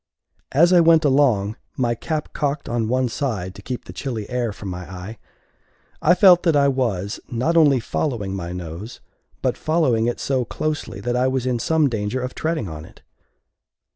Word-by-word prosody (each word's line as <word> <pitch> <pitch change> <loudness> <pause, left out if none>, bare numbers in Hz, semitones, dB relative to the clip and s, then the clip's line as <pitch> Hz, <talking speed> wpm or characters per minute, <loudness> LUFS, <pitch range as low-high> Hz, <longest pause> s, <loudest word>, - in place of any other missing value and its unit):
As 170 +6 +5
I 180 - +7
went 165 -1 +5
along, 125 -8 +2 0.2
my 120 -2 +1
cap 155 +6 -4
cocked 145 0 -2
on 120 -2 -1
one 130 +2 +1
side 110 -8 -3
to - - -12
keep 125 -2 -6
the - - -9
chilly 120 -7 -4
air 125 -3 -1
from 100 -1 -8
my 90 0 -7
eye, 95 +5 -8 0.8
I 175 +4 +5
felt 180 -2 +7
that 165 -4 +2
I 140 -1 +4
was 110 -8 -1
not 130 +7 0
only 145 -5 +5
following 110 -5 -2
my 90 -3 -4
nose, 90 +5 -7 0.4
but - - +1
following 135 -9 +1
it 120 - -2
so 130 -2 0
closely, 155 +5 -4
that 120 0 -1
I 125 +1 +2
was 130 -1 -1
in 125 -2 0
some 160 +4 +2
danger 110 0 -2
of 125 0 -4
treading 160 - -2
on 80 -2 -7
it. - - -17
125 Hz, 185 wpm, -22 LUFS, 105-145 Hz, 0.8 s, I